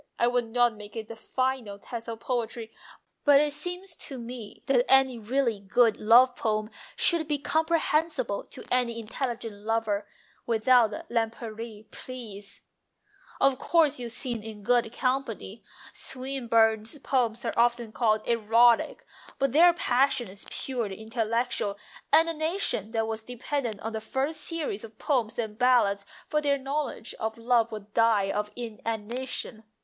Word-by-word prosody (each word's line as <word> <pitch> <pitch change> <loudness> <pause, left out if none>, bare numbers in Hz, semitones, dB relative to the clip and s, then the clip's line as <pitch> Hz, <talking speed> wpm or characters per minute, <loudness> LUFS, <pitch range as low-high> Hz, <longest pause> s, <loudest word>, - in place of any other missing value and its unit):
I - - +3
would 245 -1 +1
not 240 +1 +3
make 210 +1 -11
it 220 -1 -6
the 230 - -7
final 255 -3 -2
test 230 +3 -7
of 225 0 -6
poetry, 235 -2 -3 0.5
but 285 -1 +7
it 295 0 +1
seems 355 +4 -4
to 270 - -7
me 235 -3 -8
that 250 -3 +3
any 265 -2 +4
really 235 -1 0
good 215 +3 +3
love 245 +4 +6
poem 215 -1 -1 0.2
should 335 -3 +3
be 295 -1 0
comprehensible 315 -6 0
to - - -11
any 240 -2 +1
intelligent 230 -1 -4
lover... 215 -2 -1 0.4
without 235 0 +4 0.2
Lempriere, 225 -1 -3
please! 215 -6 -9 0.3
" - - -43
" - - -25
Of 275 -1 +3
course 305 -4 +3
you 240 -1 -5
sin 240 -1 0
in 215 -1 -9
good 240 0 +2
company. 240 -5 -2 0.3
Swinburne's 230 -3 +1
poems 245 -4 0
are 230 - -1
often 235 -1 +2
called 215 -2 +1
erotic, 230 +1 +3 0.3
but 275 -1 +1
their 340 +6 +7
passion 260 -6 +1
is 195 +2 -8
purely 230 -7 -3
intellectual, 225 -2 -1 0.3
and 325 +2 +6
a 330 - -1
nation 315 - -1
that 225 -1 0
was 220 0 -3
dependent 245 -1 -4
on 225 +1 -4
the 220 - -3
first 275 +7 -1
series 305 - -2
of 220 -1 -11
Poems 240 -6 0
and 220 -2 -4
Ballads 205 -6 +3 0.2
for 300 - 0
their 285 -1 +2
knowledge 275 -3 -4
of 220 0 -3
love 235 0 +2
would 210 -1 -8
die 220 -4 +3
of 210 0 -2
inanition. 230 +1 -4
235 Hz, 150 wpm, -27 LUFS, 220-265 Hz, 0.5 s, but